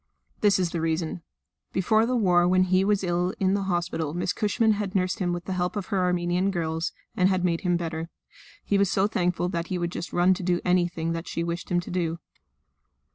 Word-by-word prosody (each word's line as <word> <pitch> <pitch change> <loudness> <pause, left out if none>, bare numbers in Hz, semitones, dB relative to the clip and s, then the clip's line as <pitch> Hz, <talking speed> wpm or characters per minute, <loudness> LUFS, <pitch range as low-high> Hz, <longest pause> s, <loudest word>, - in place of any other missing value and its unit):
This 205 -2 +4
is 180 -3 0
the 170 - -2
reason. 165 +1 -1 0.5
Before 215 +5 +3
the 255 - 0
war 180 -6 +4
when 185 +1 +4
he 185 +1 +3
was 200 0 +1
ill 180 +1 0
in 190 0 +2
the 200 - +1
hospital 170 -3 -1
Miss 180 +1 -1
Cushman 220 +2 +2
had 205 -2 -2
nursed 185 -1 0
him 180 -2 0
with 175 0 -4
the 190 - -3
help 180 +1 -1
of 205 -3 -3
her 195 - +2
Armenian 180 +1 +1
girls, 165 -2 -2 0.2
and 185 0 +3
had 185 -1 +1
made 170 -2 0
him 175 -2 +1
better; 165 -1 -4 0.5
he 200 - +1
was 200 -2 +3
so 195 0 +2
thankful 180 -3 0
that 170 -1 -3
he 185 - -2
would 175 -1 -2
just 175 - -5
run 175 +2 +4
to 185 - -5
do 175 -1 +1
anything 175 -2 +1
that 165 +1 -4
she 170 - -2
wished 170 +1 -4
him 175 - +2
to - - -9
do. 170 -2 -1
180 Hz, 225 wpm, -26 LUFS, 175-190 Hz, 0.5 s, This